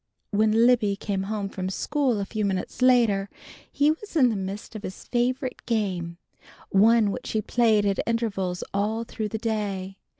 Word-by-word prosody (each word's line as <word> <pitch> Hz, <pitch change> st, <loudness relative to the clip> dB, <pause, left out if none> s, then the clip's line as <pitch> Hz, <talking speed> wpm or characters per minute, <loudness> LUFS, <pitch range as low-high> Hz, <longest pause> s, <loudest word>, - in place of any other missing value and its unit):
When 215 Hz, +2 st, +3 dB
Libby 225 Hz, -5 st, +3 dB
came 195 Hz, -1 st, -3 dB
home 210 Hz, -2 st, -2 dB
from 185 Hz, -1 st, -4 dB
school 265 Hz, +2 st, 0 dB
a 200 Hz, -, -2 dB
few 215 Hz, +1 st, -3 dB
minutes 195 Hz, +4 st, -2 dB
later, 230 Hz, -6 st, +4 dB, 0.4 s
he 290 Hz, +2 st, +3 dB
was 335 Hz, +4 st, -7 dB
in 260 Hz, -6 st, +5 dB
the 225 Hz, -, -1 dB
midst 195 Hz, +3 st, -5 dB
of 215 Hz, -, -5 dB
his 190 Hz, -, -7 dB
favorite 255 Hz, +2 st, -1 dB
game, 185 Hz, -7 st, -1 dB, 0.5 s
one 215 Hz, +1 st, +4 dB
which -, -, -5 dB
he 220 Hz, -, +1 dB
played 220 Hz, -3 st, +3 dB
at 200 Hz, -1 st, +1 dB
intervals 195 Hz, -6 st, -1 dB
all 215 Hz, +3 st, 0 dB
through 220 Hz, -2 st, -4 dB
the 220 Hz, -, -3 dB
day. 200 Hz, -4 st, -3 dB
215 Hz, 170 wpm, -25 LUFS, 195-235 Hz, 0.5 s, in